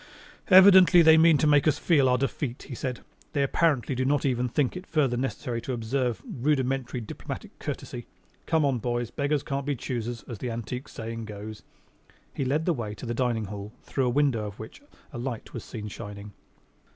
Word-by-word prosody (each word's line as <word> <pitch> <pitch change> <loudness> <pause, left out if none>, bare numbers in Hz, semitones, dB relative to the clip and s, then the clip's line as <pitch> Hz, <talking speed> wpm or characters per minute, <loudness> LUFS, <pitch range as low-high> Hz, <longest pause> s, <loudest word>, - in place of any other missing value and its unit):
"Evidently 185 -2 +8
they 160 0 +8
mean 160 -1 +6
to 155 - +1
make 145 0 +4
us 150 -2 +3
feel 145 -6 +3
our 125 - +3
defeat," 135 -1 -3
he 140 - -9
said. 125 0 -4 0.3
"They 140 -3 +2
apparently 140 -3 +1
do 130 +1 -1
not 140 +1 +1
even 125 -2 0
think 135 +3 0
it 180 +1 -8
further 140 -6 +1
necessary 120 -2 -3
to 130 - -4
observe 120 +1 -2
rudimentary 130 -2 -1
diplomatic 110 - -8
courtesy. - - -6 0.4
Come 160 -2 +2
on, 135 -3 +1
boys, 120 0 -2
beggars 145 0 0
can't 140 -1 -3
be 145 - 0
choosers, 120 -1 -4
as 115 -5 -8
the 125 - -3
antique 120 +4 -5
saying 115 0 -6
goes." 105 +1 -8 0.7
He - - -2
led 145 +5 0
the 175 - +2
way 110 -6 -5
to - - -9
the 120 - -2
dining 120 -3 0
hall 100 +2 -7
through 135 -2 -1
a - - +2
window 125 -5 +1
of 100 - -9
which 110 - -10 0.3
a 120 - -5
light 120 -2 -5
was - - -6
seen 105 -3 -7
shining. 105 0 -8
125 Hz, 195 wpm, -27 LUFS, 115-145 Hz, 0.7 s, Evidently